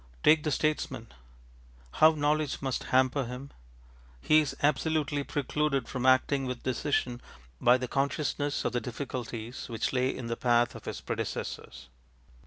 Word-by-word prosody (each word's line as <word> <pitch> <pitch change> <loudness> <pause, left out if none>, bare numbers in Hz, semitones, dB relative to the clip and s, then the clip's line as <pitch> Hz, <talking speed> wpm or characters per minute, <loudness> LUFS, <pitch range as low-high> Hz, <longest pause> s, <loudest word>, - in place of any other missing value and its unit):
Take 155 0 +6
the 150 - -1
statesman. 135 -6 -1 0.8
How 160 +1 +6
knowledge 150 -1 0
must 135 -2 -3
hamper 130 +1 +2
him! 125 +3 -7 0.7
He 155 - +5
is 150 -4 -1
absolutely 150 -1 +1
precluded 145 -2 -1
from 130 -1 -2
acting 130 +1 +3
with 125 -1 -5
decision 125 -2 -1 0.4
by 125 +1 +6
the 130 0 -4
consciousness 145 +1 -1
of - - +1
the 120 - -1
difficulties 120 -2 -6
which 115 +2 -2
lay 130 0 +2
in 130 - -4
the 115 0 -2
path 120 -1 +2
of - - -11
his - - -5
predecessors. - - -5
130 Hz, 145 wpm, -29 LUFS, 125-145 Hz, 0.8 s, Take